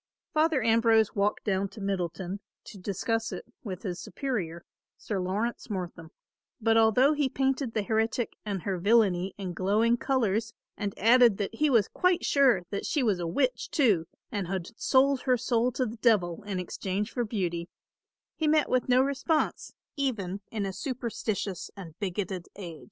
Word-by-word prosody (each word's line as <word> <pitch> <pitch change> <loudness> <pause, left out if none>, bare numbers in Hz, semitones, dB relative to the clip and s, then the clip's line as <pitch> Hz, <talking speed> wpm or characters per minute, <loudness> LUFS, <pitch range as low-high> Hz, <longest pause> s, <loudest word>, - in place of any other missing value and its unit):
Father 310 -4 +2
Ambrose 225 -1 +4
walked 205 +1 0
down 195 -1 0
to 220 - -12
Middleton 190 -1 -3 0.2
to 200 - -11
discuss 225 +4 -2
it - - -6 0.2
with 190 -5 -6
his 180 -4 -4
superior, 175 - -4 0.3
Sir 205 -3 -3
Laurence 200 +6 -2
Mortham, 180 -5 -5 0.5
but 225 0 +3
although 225 +6 +5
he 290 -3 +1
painted 265 -2 -1
the 215 - +1
heretic 220 +2 0
and 200 -4 -3
her 190 -3 -2
villainy 195 -2 +3
in 190 -3 -4
glowing 215 +6 +2
colours 230 -4 0 0.2
and 205 -2 -4
added 235 0 +6
that 205 +1 -3
he 300 +6 +2
was 230 -7 +4
quite 365 -1 +1
sure 260 -10 +4
that 200 - -3
she 290 - +1
was 205 -6 +2
a 170 - -2
witch 250 +7 0
too 215 - +2 0.2
and 200 -6 -2
had 185 -2 -3
sold 270 +1 +3
her 255 -2 +2
soul 240 0 +1
to 255 - 0
the 230 0 -6
devil 205 -7 +2
in 195 -3 -2
exchange 195 +4 -3
for 245 - -1
beauty, 180 -6 -2 0.7
he 315 - 0
met 305 0 +3
with 255 0 +1
no 255 +1 +5
response, 280 +3 -1 0.2
even 205 -9 -2
in 210 -3 -2
a 195 - -3
superstitious 220 - -3
and 175 -5 -9
bigoted 190 -2 -3
age. 170 -5 -8
215 Hz, 170 wpm, -28 LUFS, 190-250 Hz, 0.7 s, added